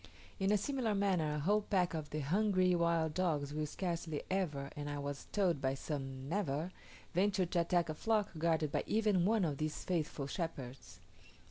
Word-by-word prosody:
In 195 +1 +2
a 210 - +5
similar 235 -1 0
manner 180 -7 +1
a - - -1
whole 205 +7 +3
pack 185 -4 +1
of 155 -2 -4
the 155 - -2
hungry 185 +3 +3
wild 170 -2 +2
dogs 150 -6 0
will 155 0 -1
scarcely 165 -2 -3
ever 150 -8 -1
(and 145 0 -4
I 145 - -3
was 140 0 -5
told 180 -8 +2
by 135 0 +1
some 135 -2 -5
never) 165 -2 -1 0.4
venture 190 +1 +2
to 170 0 +1
attack 170 0 +2
a 155 - -2
flock 215 +4 +1
guarded 160 -2 +1
by - - 0
even 210 -5 +3
one 215 -2 +3
of 145 -4 -2
these 155 0 -2
faithful 155 -5 -1
shepherds. 140 -5 -5
170 Hz, 180 wpm, -35 LUFS, 150-190 Hz, 0.4 s, a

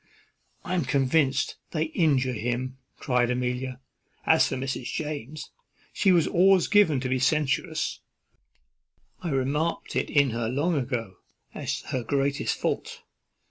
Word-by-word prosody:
"I 180 - -3
am 180 -3 +1
convinced 135 +1 +1 0.2
they 155 -2 +1
injure 150 -6 +1
him," 125 +3 -3 0.2
cries 125 -1 +1
Amelia. 125 +1 -2 0.5
"As - - +5
for - - -3
Mrs. 130 -1 -3
James, 150 -1 -5 0.4
she 195 - +3
was 170 -3 +4
always 190 +1 +4
given 200 -10 +4
to 130 - -2
be 130 0 0
censorious; 140 0 0 1.2
I 175 - -3
remarked 145 +4 -1
it - - 0
in 140 -3 +3
her 115 0 -2
long 145 +8 0
ago, 120 -8 -3 0.4
as - - -3
her 130 - -1
greatest 140 +3 0
fault. - - -3
135 Hz, 135 wpm, -26 LUFS, 125-155 Hz, 1.2 s, As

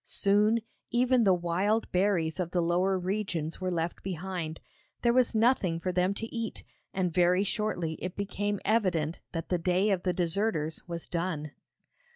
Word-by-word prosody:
Soon, 210 +3 +2 0.3
even 245 -1 +3
the 190 - +6
wild 185 +6 0
berries 180 -3 +1
of 175 -2 -1
the 180 - 0
lower 180 +3 +2
regions 185 -4 -2
were 185 - 0
left 170 -1 -2
behind; 180 -3 -4 0.4
there 235 -1 +4
was 250 -2 +3
nothing 220 -7 +3
for 185 +2 -2
them 185 +2 +1
to 225 +3 -6
eat, 230 -2 -4 0.3
and 180 -3 -1
very 180 +2 +4
shortly 200 -6 -1
it 180 -1 -4
became 205 0 -2
evident 180 -7 +1
that 165 -2 -4
the 180 - +1
day 185 +4 +2
of 190 -2 +1
the 180 - +1
deserters 170 -3 0
was 170 -1 -4
done. 165 -4 -2
185 Hz, 165 wpm, -29 LUFS, 170-205 Hz, 0.4 s, the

